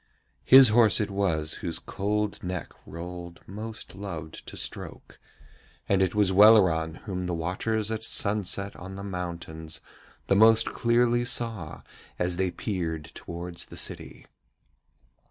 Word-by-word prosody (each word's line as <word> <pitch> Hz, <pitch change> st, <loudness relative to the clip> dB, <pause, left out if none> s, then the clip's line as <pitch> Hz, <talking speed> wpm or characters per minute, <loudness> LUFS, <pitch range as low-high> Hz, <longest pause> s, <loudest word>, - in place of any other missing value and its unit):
His 130 Hz, -2 st, +9 dB
horse 110 Hz, -1 st, +5 dB
it 105 Hz, -2 st, -1 dB
was 85 Hz, -6 st, 0 dB
whose 85 Hz, -2 st, -2 dB
cold 105 Hz, +4 st, -2 dB
neck 90 Hz, -3 st, -5 dB
Rold 85 Hz, +1 st, -8 dB
most 110 Hz, +3 st, -7 dB
loved 85 Hz, -5 st, -7 dB
to -, -, -8 dB
stroke, -, -, -6 dB, 0.7 s
and 95 Hz, -1 st, +2 dB
it 95 Hz, 0 st, +1 dB
was 105 Hz, -2 st, +3 dB
Welleran 95 Hz, -6 st, +5 dB
whom 90 Hz, -3 st, -3 dB
the 90 Hz, -, -1 dB
watchers 105 Hz, +6 st, -2 dB
at 110 Hz, 0 st, -3 dB
sunset 100 Hz, -3 st, -1 dB
on 95 Hz, +2 st, -9 dB
the 100 Hz, -, -7 dB
mountains 85 Hz, -4 st, -6 dB, 0.5 s
the -, -, +2 dB
most 110 Hz, +2 st, +6 dB
clearly 120 Hz, 0 st, +2 dB
saw 115 Hz, -9 st, -2 dB, 0.3 s
as 90 Hz, 0 st, -1 dB
they 95 Hz, 0 st, +1 dB
peered 85 Hz, -6 st, -4 dB
towards 85 Hz, 0 st, -7 dB
the -, -, -12 dB
city. -, -, -4 dB
95 Hz, 135 wpm, -27 LUFS, 85-110 Hz, 0.7 s, His